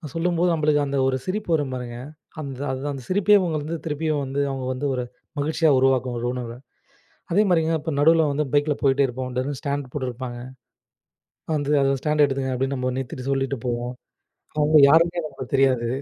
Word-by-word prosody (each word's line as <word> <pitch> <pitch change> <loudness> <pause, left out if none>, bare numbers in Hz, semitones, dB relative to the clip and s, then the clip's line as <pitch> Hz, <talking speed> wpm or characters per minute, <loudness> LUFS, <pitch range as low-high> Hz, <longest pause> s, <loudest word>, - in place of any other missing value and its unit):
சொல்லும்போது 175 +1 +1
நம்மளுக்கு 150 -2 +2
அந்த 140 0 -2
ஒரு 130 - +1
சிரிப்பு 200 0 -3
வரும் 145 -4 -2
பாருங்க. 120 -1 -6 0.4
அந்த 135 -2 -6 0.3
அந்த 135 - -7
சிரிப்பையே 205 +2 +5
உங்களால 155 0 -2
திருப்பியும் 150 -1 -1
வந்து 135 +1 -3
அவங்க 135 -1 -4
வந்து 135 +3 -4
ஒரு 125 - -2 0.4
மகிழ்ச்சியா 155 +2 +2
உருவாக்கும் 130 -2 +2
ஒரு 120 - -3
உணர்வ. 120 -2 -5 0.8
அதே 205 - +5
மாரிங்க 165 -2 +2
இப்ப 160 +2 -4
நடுவ்ல 160 +1 +5
வந்து 150 +2 0
பைக்ல 145 0 +2
போயிட்டே 140 0 +3
இருப்போம். 130 0 -5
திடீர்னு 135 +1 -2
ஸ்டாண்டு 140 -2 -3
போட்டு 130 -3 -2
இருப்பாங்க. 120 0 -6 1.2
வந்து 145 -1 -1
அந்த 135 0 +2
ஸ்டாண்டு 150 0 +2
எடுத்துகங்க 135 -1 -2
அப்படின்னு 135 +2 -1
நம்ம 130 0 -1
நிறுத்திட்டு 130 0 -5
சொல்லிட்டு 135 0 -1
போவோம். 120 +1 -2 0.7
அவங்க 150 +1 +4
யாருன்னே 170 +2 +4
நமக்குத் 155 - -9
தெரியாது. 130 -3 +3
140 Hz, 170 wpm, -23 LUFS, 130-155 Hz, 1.2 s, சிரிப்பையே